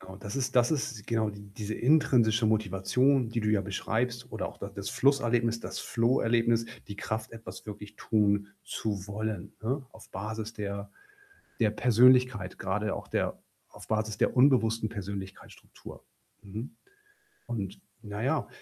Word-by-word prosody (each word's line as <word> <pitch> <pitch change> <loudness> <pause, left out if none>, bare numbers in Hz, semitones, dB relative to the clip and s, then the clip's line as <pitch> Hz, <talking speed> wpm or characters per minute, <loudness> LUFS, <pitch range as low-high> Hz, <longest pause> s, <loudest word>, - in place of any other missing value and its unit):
Genau, 95 +1 -10
das 100 +2 -6
ist 130 -1 -1
das 120 -1 +5
ist 130 -8 -2
genau 110 -2 +1
die 100 0 -11
diese 110 0 -4
intrinsische 120 -5 +4
Motivation, 110 +5 +2
die 115 0 -1
du 105 - 0
ja 105 -2 +3
beschreibst, 120 +5 -2
oder - - -2
auch - - -12
da - - -5
das - - -5
Flusserlebnis, 120 -4 +2
das - - -5
Flow 120 +2 +2
Erlebnis, 115 0 +2 0.2
die 100 - -6
Kraft, 110 +2 -3
etwas 105 -5 -9
wirklich 105 0 -8
tun 100 -2 +2 0.2
zu 100 -3 -3
wollen, 105 -2 -4
ne? 130 +4 -1
Auf - - -15
Basis 110 +2 -4
der 100 -2 -5 0.7
der 110 -2 +4
Persönlichkeit, 125 -3 +4
grade 100 +2 -1
auch - - -7
der - - -1 0.3
auf - - -13
Basis 110 -1 0
der - - +2
unbewussten 115 -4 +4
Persönlichkeitsstruktur. 100 -3 -8 0.4
Mhm. 105 +5 -7 0.7
Und 100 -5 -4 0.2
na 105 0 -5
ja, 140 +2 +1
110 Hz, 150 wpm, -29 LUFS, 100-120 Hz, 0.7 s, das